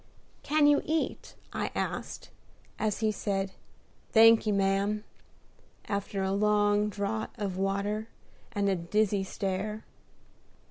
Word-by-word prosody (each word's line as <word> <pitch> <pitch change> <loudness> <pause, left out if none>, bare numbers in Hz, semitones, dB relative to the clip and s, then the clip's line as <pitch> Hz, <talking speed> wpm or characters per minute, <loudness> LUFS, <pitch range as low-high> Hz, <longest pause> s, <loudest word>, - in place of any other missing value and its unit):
"Can 305 0 +3
you 290 0 +5
eat?" 320 +1 -2 0.2
I - - -1
asked, - - -4 0.5
as 215 0 -1
he 215 -1 +2
said, 195 -2 -2 0.6
"Thanky, 225 -1 +6
ma'am," 200 +1 +1 0.8
after 200 -1 -2
a 190 - 0
long 205 +1 +2
draught 210 +2 -3
of 200 -4 -3
water 200 +3 -1 0.4
and 205 -2 0
a 195 - +2
dizzy 200 +3 +1
stare. 195 +3 -3
205 Hz, 110 wpm, -29 LUFS, 195-215 Hz, 0.8 s, Thanky